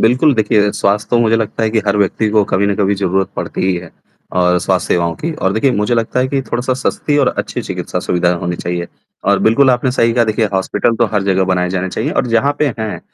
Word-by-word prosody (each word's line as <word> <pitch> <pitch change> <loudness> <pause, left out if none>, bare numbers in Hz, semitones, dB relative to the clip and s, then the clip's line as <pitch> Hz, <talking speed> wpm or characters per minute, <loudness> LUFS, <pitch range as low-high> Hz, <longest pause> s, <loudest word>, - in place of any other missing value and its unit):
बिल्कुल, 130 +6 +3
देखिए 105 -2 +2
स्वास्थ्य 105 +1 0
तो 120 - +3
मुझे 115 -1 +3
लगता 115 0 -2
है 110 - +1
कि 110 - +1
हर 100 0 +2
व्यक्ति 105 +2 +1
को 105 0 +3
कभी 100 +2 +2
न 100 - +1
कभी 100 -1 +1
ज़रूरत 95 -1 0
पड़ती - - -4
ही 95 - +2
है 85 -1 -8 0.5
और 90 0 +3
स्वास्थ्य - - 0
सेवाओं 85 -1 0
की 165 - -4
और 95 -10 -1
देखिए 110 +6 +2
मुझे 105 +3 0
लगता 115 +2 0
है 130 - 0
कि 135 0 0
थोड़ा-सा 125 +1 -2
सस्ती 140 +3 -1
और - - +3
अच्छी - - -3
चिकित्सा - - -4
सुविधा 90 0 +1
होनी 90 0 -2
चाहिए 85 0 -3 0.4
और - - +3
बिल्कुल 130 +5 +4
आपने 125 +1 +1
सही 115 -2 +2
कहा 120 0 +2
देखिए 110 0 0
हॉस्पिटल 95 +4 0
तो - - +2
हर 100 - +2
जगह 95 -1 +1
बनाए 90 -1 0
जाने 95 0 -2
चाहिए - - -2
और - - 0
जहाँ 120 +4 +2
पे 150 - +2
हैं 110 -1 -4
105 Hz, 240 wpm, -16 LUFS, 95-120 Hz, 0.5 s, बिल्कुल